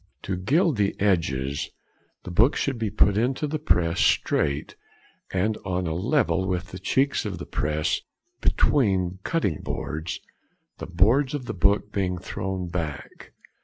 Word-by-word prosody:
To 95 - -2
gild 145 - +2
the 100 -1 0
edges, 75 -9 0 0.5
the 90 - -7
book 115 - +4
should 135 -4 -1
be 110 -2 0
put 105 0 +3
into 130 +5 0
the 150 +1 -2
press 85 - +1
straight 70 0 +1 0.6
and 105 +4 0
on 90 -1 -1
a 80 - -1
level 95 - +1
with 90 +1 -2
the 90 - -7
cheeks 140 +1 +1
of 100 -5 -4
the - - -6
press 75 +1 -1 0.4
between 95 -9 +2
cutting 100 - 0
boards, 80 +1 -4 0.6
the - - -6
boards 115 - +3
of 135 -4 -5
the - - -4
book 100 +2 +2
being 90 -2 -1
thrown 95 +1 -4
back. 80 -5 -5
95 Hz, 150 wpm, -25 LUFS, 85-115 Hz, 0.6 s, book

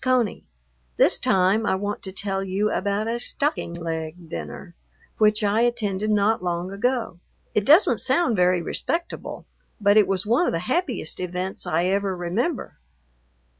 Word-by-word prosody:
CONEY,... 255 -5 0 0.5
This - - +4
time 190 +4 +3
I - - +2
want 205 +2 -3
to 190 - -6
tell 195 0 -2
you 195 +3 0
about 205 +1 -1
a 235 +1 -1
"stocking 280 - -2
leg" 165 0 -5
dinner 170 - -7 0.5
which 215 0 +3
I 210 +2 +2
attended 215 -4 0
not 210 -1 +2
long 175 +1 -2
ago. 235 -1 -1 0.4
It 210 -1 0
doesn't 320 +7 +6
sound 340 -10 +2
very 180 -1 +2
respectable, 335 - -4 0.3
but 205 0 +4
it 210 - +6
was 195 0 0
one 240 +11 +2
of - - 0
the - - +1
happiest 280 - -2
events 180 +1 -4
I 165 +3 +1
ever 195 0 0
remember. 210 - -2
200 Hz, 155 wpm, -24 LUFS, 180-225 Hz, 0.5 s, doesn't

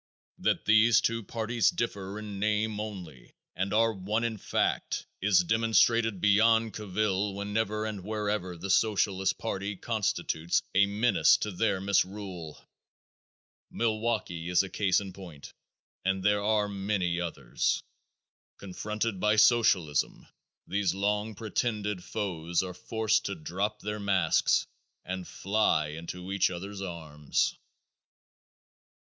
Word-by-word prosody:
That - - 0
these 110 +2 +6
two 115 0 0
parties 115 -1 0
differ 100 -4 -3
in 105 -2 -6
name 105 0 0
only 90 - -8 0.2
and 95 +2 -2
are 115 +1 +3
one 105 +4 -2
in 115 -2 -1
fact - - -1 0.2
is 95 -2 +4
demonstrated 115 +1 +3
beyond 110 +3 +4
cavil 100 -1 -1
whenever 105 +1 -1
and 105 -4 -5
wherever 105 -4 -2
the 95 +3 -3
Socialist 95 -1 +2
party 100 -2 -3
constitutes 95 -6 -1
a 100 +1 +5
menace 105 +4 +4
to 105 - -3
their 95 +1 0
misrule. 95 -4 -2 1.1
Milwaukee 110 -7 -1
is 90 +1 +4
a 95 - -6
case 95 -3 +2
in 95 -2 -8
point 85 -7 -11 0.5
and 95 0 0
there 105 0 +3
are 105 -1 +2
many 95 -3 -1
others. 70 -8 -1 0.7
Confronted 105 +2 -3
by 105 +2 +3
the - - -4
Socialists 105 - +4 0.6
these 95 -2 0
long 105 +2 -1
pretended 105 -3 -2
foes 85 -5 -2
are 90 -1 -5
forced 110 +1 0
to 100 - -2
drop 95 +6 -3
their 105 +1 -4
masks 95 -5 +2 0.4
and 95 -1 -5
fly 100 -7 +1
into 85 +4 -7
each 100 -1 +2
other's 95 +3 -6
arms. 80 -5 -2
100 Hz, 125 wpm, -29 LUFS, 90-110 Hz, 1.1 s, these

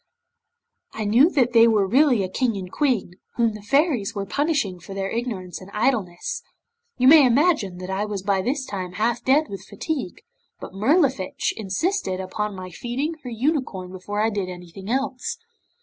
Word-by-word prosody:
'I 220 - -3
knew 240 +10 +5
that 250 -8 +1
they 230 0 +7
were 215 -3 +3
really 250 0 +4
a - - -1
King 230 +3 0
and 185 -2 -7
Queen, 240 -11 0 0.2
whom 230 -2 +2
the 210 - -9
Fairies 260 - +1
were 200 -1 -2
punishing 280 - 0
for 185 +3 -10
their 195 0 -2
ignorance 210 -8 -4
and 185 - -11
idleness. 225 - -1 0.6
You 255 - +4
may 305 +1 +9
imagine 250 - +2
that 185 +1 -6
I 195 +2 -1
was 205 -3 -4
by 195 -1 +1
this 260 +6 -1
time 185 -5 -5
half 225 +3 0
dead 290 +4 +3
with 195 -1 -7
fatigue, 300 - -4 0.4
but - - -9
Mirlifiche 255 - +1
insisted 215 - -1
upon 205 +2 -3
my 185 -1 -8
feeding 255 - -3
her 250 - -6
unicorn 235 - -2
before 205 +3 -4
I 220 +1 +2
did 200 -3 -2
anything 180 +2 -9
else. 265 - -2
220 Hz, 175 wpm, -23 LUFS, 190-265 Hz, 0.6 s, may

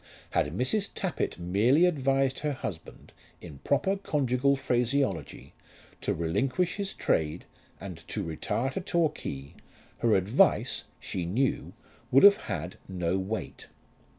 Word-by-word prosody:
Had 75 +5 0
Mrs. 195 - 0
Tappitt 180 -7 -2
merely 105 - +3
advised 135 -5 +1
her 150 -1 -1
husband, 95 -11 -7 0.3
in 75 -6 -11
proper 150 - +1
conjugal 140 -6 +1
phraseology, 125 - -1 0.5
to - - -1
relinquish 125 - 0
his 200 -1 -3
trade 80 +2 0 0.3
and 95 -3 -7
to 105 - -3
retire 105 - -2
to 190 - -3
Torquay, 155 - -2 0.5
her 115 -2 +3
advice, 95 +6 +2
she 85 -2 -4
knew, 125 +9 0 0.4
would 135 - +5
have 200 0 +9
had 90 -5 -5
no 90 0 -1
weight. 100 +4 -5
125 Hz, 125 wpm, -28 LUFS, 90-140 Hz, 0.5 s, have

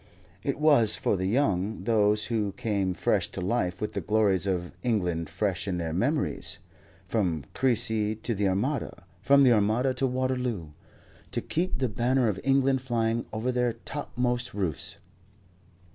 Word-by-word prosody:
It - - -2
was 140 -9 +5
for - - 0
the 95 0 -1
young, 105 -3 0
those 105 -2 +2
who 105 -4 -1
came 100 -6 -1
fresh - - +1
to - - -4
life 90 -2 -1
with 105 - -3
the 100 - -2
glories 100 -1 +2
of 90 -2 -1
England 90 -9 -1
fresh 100 -3 -2
in 90 -2 -1
their 80 -2 -3
memories, 140 - -1 0.5
from 85 - -1
Crecy 110 -4 +1
to 115 +2 -3
the 100 -1 0
Armada, 105 +9 -2 0.2
from 140 +6 +5
the 125 -2 +6
Armada 110 +5 +2
to 130 +1 0
Waterloo, 125 -9 -2 0.6
to - - -2
keep 180 +3 -1
the 130 0 0
banner 120 +3 +1
of 100 -3 -1
England 135 -1 +3
flying 115 -2 -1
over 115 +3 -1
their 125 -1 +1
topmost 125 -5 -3
roofs. 90 -9 -2
110 Hz, 155 wpm, -27 LUFS, 95-125 Hz, 0.6 s, the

